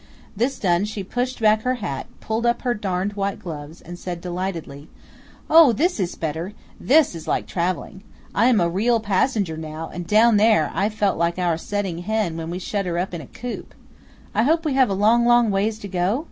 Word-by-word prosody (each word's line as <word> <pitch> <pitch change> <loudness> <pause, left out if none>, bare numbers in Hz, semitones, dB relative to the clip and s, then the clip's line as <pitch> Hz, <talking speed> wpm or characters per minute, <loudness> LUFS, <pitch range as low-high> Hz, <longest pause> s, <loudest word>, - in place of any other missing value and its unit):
This 250 +6 0
done 180 -1 +1
she 210 -1 -5
pushed 250 +6 -3
back 215 -1 +4
her 255 +2 0
hat, 170 - -5
pulled 220 +1 -2
up 240 0 +1
her 245 -2 +1
darned 195 -2 -2
white 200 -1 -1
cotton - - -19
gloves, 155 -1 -8
and 175 +1 -10
said 175 -2 -5
delightedly: 170 -5 -5 0.6
"Oh! 315 -5 +7
this 340 - 0
is 180 -2 -2
better! 165 +5 -4 0.3
This 295 -2 +4
is 165 -2 -9
like - - 0
traveling! 185 +2 -3 0.3
I 235 - +3
am 245 -4 +4
a 170 - +2
real 225 +7 +1
passenger 200 -4 0
now, 160 0 -6
and 175 0 -6
down 220 +2 +5
there 210 -7 +4
I 200 +2 +1
felt 210 -5 0
like 170 +1 +1
our 175 -2 +1
setting 190 0 -3
hen 210 -2 -1
when 165 0 -5
we 175 - -3
shut 195 +1 -3
her 170 -1 -2
up 180 +1 -2
in 170 - -4
a 135 - -11
coop. 245 0 -7 0.6
I - - +2
hope 320 +7 +2
we 300 - +1
have 260 -3 +4
a 195 - 0
long, 220 +4 +4
long 240 -2 +4
ways 210 +3 0
to 205 - -8
go?" 185 +5 0
200 Hz, 215 wpm, -22 LUFS, 175-230 Hz, 0.6 s, Oh